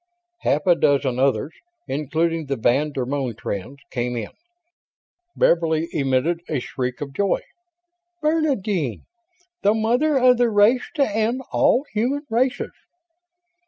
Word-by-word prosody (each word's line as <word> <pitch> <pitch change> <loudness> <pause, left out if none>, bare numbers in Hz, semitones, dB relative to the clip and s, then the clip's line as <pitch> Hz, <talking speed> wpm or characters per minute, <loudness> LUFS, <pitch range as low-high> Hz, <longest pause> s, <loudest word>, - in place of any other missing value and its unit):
Half 150 - 0
a 180 - +6
dozen 140 -5 +1
others, 140 +3 +1 0.3
including 160 +2 -1
the 140 - -1
van 135 +6 +1
der 130 -3 -2
Moen 130 -3 -2
twins, 100 +9 -5
came 125 -1 -2
in. 110 -3 -4 1.0
Beverly 165 -1 +2
emitted 150 +2 0
a 150 - 0
shriek 125 +2 -4
of 140 -1 -5
joy. 200 +4 +1 0.8
"Bernadine! 225 - 0 0.6
The 205 +2 +3
mother 245 +7 +2
of 250 -1 +5
the 240 -1 +3
race 220 +4 +3
to 280 -3 +3
end 225 +5 -1
all 265 +4 +3
human 260 +7 -1
races!" 250 +3 0
165 Hz, 125 wpm, -22 LUFS, -, 1.0 s, a